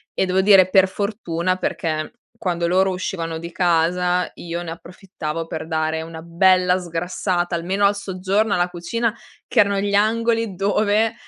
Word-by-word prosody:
e - - +1
devo 185 +1 +2
dire 190 -2 +6
per 190 -1 +5
fortuna, 185 -3 -2
perché 155 -4 -3 0.2
quando 170 -3 -2
loro 190 +2 +3
uscivano 170 -3 -3
di 170 +1 -7
casa 180 +1 +1
io 170 0 -5
ne 165 - -6
approfittavo 165 -2 -6
per 160 -1 -6
dare 160 0 -1
una 160 0 -8
bella 180 +1 +3
sgrassata 175 +1 -2
almeno 190 +4 0
al 200 - +3
soggiorno, 200 +2 -1
alla 175 0 +1
cucina, 215 +6 -2 0.3
che - - +1
erano 200 -1 +3
gli 200 0 -1
angoli 225 0 +1
dove 210 +3 +1
180 Hz, 155 wpm, -21 LUFS, 170-200 Hz, 0.3 s, dire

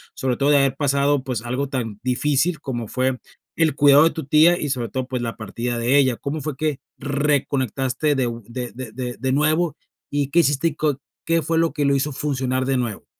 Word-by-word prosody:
Sobre 130 -2 -1
todo, 140 +2 +1
de 145 - +6
haber 135 -1 +2
pasado, 140 -1 +1
pues, 125 -4 -3
algo 130 +4 -2
tan 115 -7 -4
difícil, 145 +5 +1
como 120 -6 -4
fue, 130 0 0 0.4
el 160 -4 +2
cuidado 145 0 +6
de - - +5
tu 160 -3 -6
tía 155 +5 +5
y, 145 - -2
sobre 125 -4 -2
todo, 130 +5 -3
pues, 130 -2 -3
la 115 -1 -4
partida 120 +2 -4
de 120 +3 +2
ella, 130 -4 +3
¿cómo 150 +2 -4
fue 145 -1 -4
que 150 -2 -1 0.2
reconectaste 140 -1 0
de 130 -2 +1
u 120 0 -5
de 125 +1 -5
de 125 -2 -7
de 125 +1 -5
de 130 0 -1
nuevo? 155 +4 +2 0.3
Y, 145 -1 0
¿qué 170 - +4
hiciste? 145 -1 +2
Y, 150 - -10
co 150 -3 0 0.3
¿qué 165 0 +2
fue 165 +2 -1
lo 165 0 +2
que 145 - -1
lo 140 0 +3
hizo 140 +2 0
funcionar 130 -2 -1
de 135 0 +1
nuevo? 120 -5 -3
135 Hz, 225 wpm, -22 LUFS, 125-150 Hz, 0.4 s, de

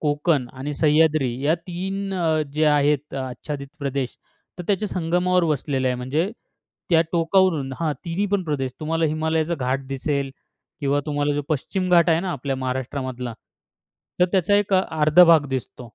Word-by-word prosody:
कोकण 145 -2 +1
आणि 135 +3 -5
सह्याद्री 155 -2 +3
या 155 +3 +4
3 190 +3 -5
अ, 160 -3 +1
जे 155 +2 +1
आहेत 150 -1 +2
आच्छादित 140 +2 -5
प्रदेश 140 -2 -3 0.4
तर 180 - -4
त्याच्या 205 +1 0
संगमावर 180 +1 +1
वसलेलं 140 -4 0
आहे. 125 - 0
म्हणजे 145 +10 -1 0.6
त्या 165 -2 +6
टोकावरून 165 -4 +2
हां 160 -3 +1
तिन्हीपण 190 +3 -1
प्रदेश 135 -5 -2
तुम्हाला 165 +1 0
हिमालयाचा 160 +1 0
घाट 135 -1 -2
दिसेल 140 0 -2 0.5
किंवा 140 0 +1
तुम्हाला 145 0 0
जो 145 - -1
पश्चिम 185 +5 -1
घाट 170 -1 +5
आहे 165 +1 +3
ना, 190 - -3
आपल्या 135 -2 -3
महाराष्ट्रामधला 130 -1 -4 0.9
तर - - +7
त्याचा 190 +1 +3
एक 205 -1 0
अ, 185 - +4 0.2
अर्धा 155 +4 +7
भाग 165 -4 +5
दिसतो. 120 +1 -8
155 Hz, 155 wpm, -23 LUFS, 135-170 Hz, 0.9 s, तर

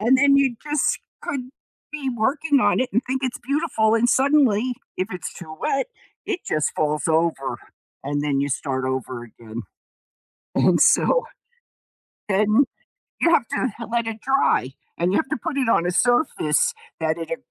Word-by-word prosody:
and 240 +5 +4
then 280 +1 +5
you 275 -3 +3
just 295 -2 0 0.2
could 255 -3 -4 0.4
be 295 -3 -4
working 270 +4 +1
on - - +3
it 255 0 +1
and 235 +5 +2
think 260 +1 -2
it's 255 - -2
beautiful 245 -5 +1
and 240 +2 +2
suddenly, 255 -3 +3 0.2
if 185 +2 -1
it's 180 -2 -5
too 160 -3 -9
wet, 275 - 0 0.4
it 400 -4 -2
just 155 -1 0
falls 150 0 0
over 160 -4 0 0.5
and 145 +1 -1
then 140 -2 0
you 140 - 0
start 130 -1 -2
over 130 -2 -3
again. 115 0 -9 0.9
And - - +4
so - - +4 1.0
then 210 +6 +3 0.6
you 335 - +4
have 235 - +2
to 230 -2 -3
let 235 0 0
it 225 -1 -5
dry 265 - +2 0.3
and 175 +2 +1
you - - +3
have 315 - -1
to - - -1
put 285 +4 -4
it 260 -3 +1
on 175 - +3
a 180 - 0
surface 240 - +2 0.3
that 160 0 0
it 165 - -6
a 245 - -1
230 Hz, 170 wpm, -23 LUFS, -, 1.0 s, then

